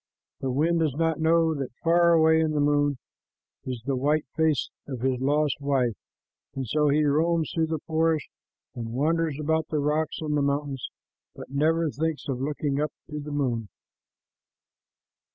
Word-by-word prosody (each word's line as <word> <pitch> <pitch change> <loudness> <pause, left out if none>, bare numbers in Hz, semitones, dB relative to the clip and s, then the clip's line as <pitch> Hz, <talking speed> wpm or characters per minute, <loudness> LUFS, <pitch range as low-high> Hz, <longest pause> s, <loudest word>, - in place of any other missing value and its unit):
The 135 - -2
wind 160 +6 +2
does 155 -5 0
not 165 0 0
know 165 0 +3
that 135 -5 -5
far 170 +1 +5
away 160 0 +5
in 160 -1 +1
the 150 - 0
moon 145 -1 +2 0.7
is 125 -4 -5
the 135 -1 0
white 145 +4 +1
face 160 -4 +1 0.2
of 130 -4 -5
his 130 -1 0
lost 145 +1 +1
wife, 135 -5 +1 0.6
and 135 -1 -3
so 150 +5 +2
he 150 +2 +3
roams 160 +2 +1
through 160 -1 +1
the 160 -2 -3
forest 160 -1 +1 0.5
and 115 -2 -6
wanders 160 +1 +1
about 160 +1 0
the 155 - -2
rocks 150 +2 0
and 150 -1 -2
the 145 - +2
mountains, 140 -2 -1 0.5
but - - -10
never 160 +3 +2
thinks 160 +1 -2
of 130 -2 -2
looking 145 0 -1
up 150 - -1 0.2
to 150 - -4
the 150 +1 -7
moon. 125 -7 -1
150 Hz, 170 wpm, -26 LUFS, 140-160 Hz, 0.7 s, far